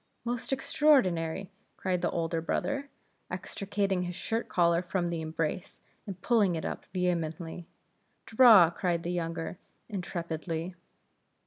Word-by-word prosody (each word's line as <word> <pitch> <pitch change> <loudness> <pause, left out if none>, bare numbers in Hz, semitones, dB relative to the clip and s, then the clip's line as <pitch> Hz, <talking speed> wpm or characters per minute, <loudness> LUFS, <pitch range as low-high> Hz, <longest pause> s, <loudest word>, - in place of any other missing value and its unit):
"Most 240 +1 -3
extraordinary!" 195 - +2 0.3
cried 185 -2 -1
the 175 - 0
elder 165 -1 -1
brother, 280 - -2 0.4
extricating 200 -2 -2
his 180 -1 -4
shirt 225 +5 -3
collar 170 -1 +3
from 175 -1 -2
the 165 -1 -2
embrace, 160 +2 -3 0.3
and 190 -2 -6
pulling 210 -7 +3
it 160 - -4
up - - -5
vehemently. 170 -2 -2 0.6
"Draw!" 220 -8 +7
cried 170 -2 -1
the 175 - -2
younger, 165 0 -3 0.3
intrepidly. 170 -3 -4
180 Hz, 120 wpm, -30 LUFS, 165-200 Hz, 0.6 s, Draw